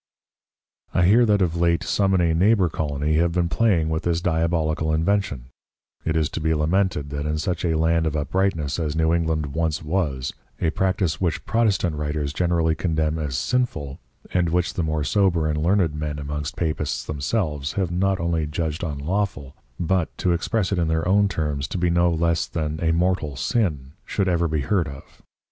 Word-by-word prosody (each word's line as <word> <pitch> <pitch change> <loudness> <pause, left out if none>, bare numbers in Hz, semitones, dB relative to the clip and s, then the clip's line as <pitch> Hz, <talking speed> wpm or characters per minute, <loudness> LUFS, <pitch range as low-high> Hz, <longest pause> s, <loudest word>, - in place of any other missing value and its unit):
I 90 - +4
hear 115 +6 +5
that 105 -2 +3
of 85 -2 -1
late 85 0 +2
some 95 -1 +1
in 90 - +3
a 85 -1 +2
Neighbour 95 +1 +3
Colony 75 0 -1
have 85 +1 +2
been 90 -1 +1
playing 90 -7 +2
with 80 0 -1
this 85 -1 0
Diabolical 80 -2 0
invention: 80 -6 0 0.5
It 80 - -1
is 80 -2 +2
to - - -4
be 80 +1 +1
lamented, 80 -2 0
that 70 +1 -3
in 75 0 -1
such 85 +2 -2
a 80 -2 +1
Land 80 0 +2
of 80 - -2
Uprightness 85 -1 0
as 75 -2 -2
New 80 0 +2
England 80 -4 -1
once 80 -1 -1
was, 75 -6 -1 0.3
a 80 - +1
Practice 95 -4 0
which 85 -3 -1
Protestant 100 -8 +1
Writers 75 -1 -2
generally 85 -1 +1
condemn 80 -1 -1
as 70 -5 -2
sinful, 80 - -1 0.3
and 90 -2 +2
which 90 +1 0
the - - -2
more 80 -2 -1
sober 90 -2 +2
and 75 0 -1
learned 90 -2 +2
Men 75 -1 -3
amongst 75 0 -4
Papists 80 -3 -2
themselves 75 -1 -2
have 95 -4 -1
not 95 +2 +1
only 85 -2 0
judged 80 +2 -3
unlawful, 75 -2 -2 0.2
but 90 0 0
(to 90 - +1
express 95 +4 -1
it 95 - +1
in 85 - +1
their 80 +1 0
own 100 +2 +4
terms) 75 -7 -2
to - - -4
be 90 -1 +1
no 85 0 +3
less 85 0 +1
than 75 -1 -3
a 80 - +3
Mortal 85 -4 0
Sin, 75 - -1
should 100 -2 -1
ever 85 -2 +2
be 80 -2 -1
heard 90 +1 +1
of. 70 -1 -12
80 Hz, 190 wpm, -23 LUFS, 75-90 Hz, 0.5 s, hear